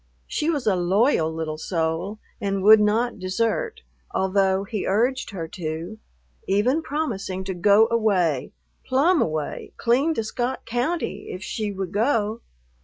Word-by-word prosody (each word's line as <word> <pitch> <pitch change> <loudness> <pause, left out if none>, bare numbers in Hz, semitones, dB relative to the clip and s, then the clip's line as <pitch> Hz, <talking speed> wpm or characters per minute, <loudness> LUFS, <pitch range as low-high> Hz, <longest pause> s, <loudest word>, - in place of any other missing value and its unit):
She 305 - -1
was 295 -6 -1
a 205 -3 +3
loyal 180 - +2
little 160 -1 -4
soul 165 +5 -2 0.2
and 195 -1 -1
would 215 +1 +9
not 220 +2 +1
desert, 230 - -1 0.3
although 190 0 +1
he 205 0 -4
urged 245 +7 +1
her 170 -5 -5
to, 165 +5 -5 0.5
even 235 +11 +2
promising 235 -11 -3
to 190 0 -3
go 205 +5 +5
away, 185 - +1 0.3
"plumb 300 +7 +3
away, 155 -2 -3
clean 270 +7 +2
to 225 - -1
Scott 245 +4 -3
County 245 - -2
if 185 - -6
she 210 +1 -3
would 190 -2 -4
go." 220 0 +1
205 Hz, 140 wpm, -24 LUFS, 185-240 Hz, 0.5 s, would